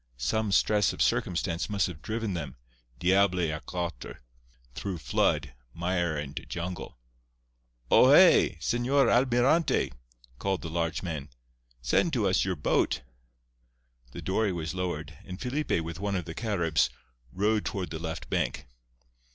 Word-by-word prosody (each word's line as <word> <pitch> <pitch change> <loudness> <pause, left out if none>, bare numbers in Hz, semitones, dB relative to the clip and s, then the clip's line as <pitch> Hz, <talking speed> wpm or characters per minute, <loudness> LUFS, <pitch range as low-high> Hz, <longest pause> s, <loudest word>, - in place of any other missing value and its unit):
Some 100 - 0
stress 105 0 +3
of - - -5
circumstance 85 0 0
must 100 -1 +1
have 80 -5 -7
driven 110 -2 -3
them, 75 -6 -5 0.4
diable 95 +3 +3
à 80 -3 -1
quatre, 85 -9 -5 0.5
through 95 +6 -4
flood, 70 -4 0 0.2
mire 85 -2 0
and 75 0 -5
jungle. 85 -4 -5 0.9
"O - - +7
hé! - - +6
Señor 120 - +2
Almirante," 125 - +3 0.5
called 95 -2 -1
the 80 - -5
large 85 +1 -1
man. 80 -5 -4 0.5
"Send 60 - +2
to - - +2
us - - +2
your 95 -1 -1
boat." 70 -3 +1 1.1
The - - -8
dory 100 +2 +1
was 85 -2 -4
lowered, 80 -4 -4
and 90 0 -8
Felipe, 135 - -1
with 85 +1 -6
one 100 0 -1
of 90 -3 -2
the 80 - -6
Caribs, 85 - +1 0.4
rowed 105 +4 +1
toward 90 -5 -4
the 80 - -4
left 80 +1 -5
bank. - - -1
90 Hz, 140 wpm, -28 LUFS, 80-105 Hz, 1.1 s, O